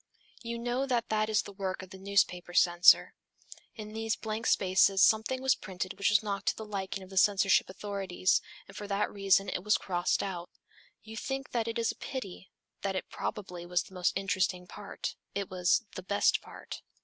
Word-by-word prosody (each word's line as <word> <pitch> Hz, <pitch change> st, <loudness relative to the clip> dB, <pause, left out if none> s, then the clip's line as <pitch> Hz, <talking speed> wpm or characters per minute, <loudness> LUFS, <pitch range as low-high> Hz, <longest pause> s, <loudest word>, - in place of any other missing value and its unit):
You 235 Hz, 0 st, -4 dB
know 245 Hz, +3 st, -1 dB
that 240 Hz, -3 st, 0 dB
that 215 Hz, 0 st, +1 dB
is 215 Hz, -1 st, +2 dB
the -, -, -9 dB
work 190 Hz, -1 st, -4 dB
of 185 Hz, -, -13 dB
the 190 Hz, -, -10 dB
newspaper 190 Hz, -3 st, 0 dB
censor. 175 Hz, +1 st, +6 dB, 0.6 s
In 215 Hz, -1 st, -8 dB
these 225 Hz, 0 st, -1 dB
blank 220 Hz, +1 st, -4 dB
spaces 190 Hz, +1 st, +4 dB
something 220 Hz, +4 st, +3 dB
was 265 Hz, -1 st, +5 dB
printed 185 Hz, 0 st, -5 dB
which 200 Hz, -, +2 dB
was 205 Hz, 0 st, +4 dB
not 200 Hz, -1 st, -3 dB
to -, -, +3 dB
the 220 Hz, -, -6 dB
liking 195 Hz, -2 st, -4 dB
of 185 Hz, -, -14 dB
the 190 Hz, -, -8 dB
censorship 195 Hz, -1 st, +4 dB
authorities, 190 Hz, -1 st, 0 dB, 0.3 s
and 195 Hz, -, -14 dB
for 205 Hz, -, -6 dB
that 200 Hz, +1 st, -1 dB
reason 195 Hz, -1 st, +3 dB
it 180 Hz, -, -2 dB
was 210 Hz, 0 st, +3 dB
crossed 175 Hz, -2 st, 0 dB
out. 180 Hz, -3 st, -5 dB, 0.5 s
You 220 Hz, 0 st, -10 dB
think 270 Hz, +4 st, -4 dB
that 230 Hz, -2 st, -1 dB
it 230 Hz, -, -2 dB
is 230 Hz, -2 st, +1 dB
a -, -, -12 dB
pity, 195 Hz, -8 st, -7 dB, 0.3 s
that 195 Hz, -1 st, -2 dB
it -, -, -4 dB
probably 185 Hz, -5 st, -5 dB
was 175 Hz, 0 st, 0 dB
the -, -, -16 dB
most 180 Hz, -1 st, +1 dB
interesting 185 Hz, -2 st, 0 dB
part, 200 Hz, +2 st, -6 dB, 0.2 s
it 200 Hz, -2 st, -3 dB
was 185 Hz, +5 st, +2 dB
"the -, -, -6 dB
best 200 Hz, +2 st, +2 dB
part." -, -, -9 dB
200 Hz, 195 wpm, -30 LUFS, 185-220 Hz, 0.6 s, censor